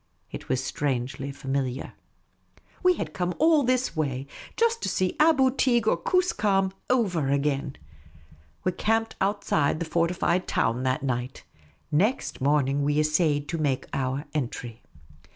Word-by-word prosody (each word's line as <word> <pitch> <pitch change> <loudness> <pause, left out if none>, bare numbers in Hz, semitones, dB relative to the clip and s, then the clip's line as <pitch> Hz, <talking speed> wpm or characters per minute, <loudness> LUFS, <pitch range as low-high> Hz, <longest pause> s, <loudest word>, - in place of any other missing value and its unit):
It - - -8
was 130 0 0
strangely 135 0 -2
familiar. 135 -2 -3 0.9
We 365 0 +4
had 155 - -5
come 180 -1 -2
all 315 -1 +5
this 255 -6 0
way 135 -4 -2 0.3
just 465 0 +2
to - - -1
see 185 -1 0
Aboo 290 -4 +5
Teeg 240 -4 +2
or - - +4
Koos 365 - +1
kam 195 -2 +1 0.2
over 185 - +1
again! 140 0 0 0.9
We 185 - +1
camped 225 +4 0
outside 190 -7 +1
the 170 - -2
fortified 170 +2 0
town 115 +2 0
that 130 +3 0
night. 130 -1 -3 0.5
Next 200 - 0
monn'ng 140 0 +2
we 145 +1 +1
essayed 155 -1 +1
to 165 - -2
make 140 -4 0
our 135 +2 -2
entry. 120 -5 -4
155 Hz, 140 wpm, -26 LUFS, 135-210 Hz, 0.9 s, all